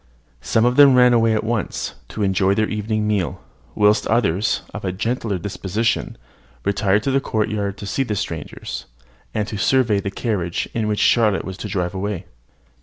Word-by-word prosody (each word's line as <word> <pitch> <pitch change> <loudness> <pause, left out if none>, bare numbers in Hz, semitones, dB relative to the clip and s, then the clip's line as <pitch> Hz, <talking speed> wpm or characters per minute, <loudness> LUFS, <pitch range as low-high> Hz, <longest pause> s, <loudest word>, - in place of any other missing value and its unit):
Some 110 - +2
of 125 +1 +2
them 140 -2 +8
ran 125 -1 +6
away 115 -1 +3
at 110 - 0
once, 115 -3 -2
to 105 - -4
enjoy 95 0 +2
their 110 0 +1
evening 105 0 -1
meal; 100 -5 -1 0.4
whilst 105 0 +3
others, 110 -2 +1
of 105 - -6
a 95 - -1
gentler 110 +1 -2
disposition, 100 +4 -2 0.5
retired 100 +1 +2
to 135 - 0
the 135 +1 +2
courtyard 105 -4 -1
to 100 - -7
see 100 +7 -1
the 110 -6 -1
strangers, 80 -9 -5 0.5
and 105 -1 0
to 110 -3 -5
survey 120 -4 +3
the 100 - -3
carriage 100 -5 -2
in 110 -2 -1
which 105 -1 0
their 120 - +4
Charlotte 105 -3 +2
was 95 -1 -6
to 105 - -5
drive 90 -3 -2
away. 95 -1 -3
105 Hz, 180 wpm, -21 LUFS, 100-115 Hz, 0.5 s, them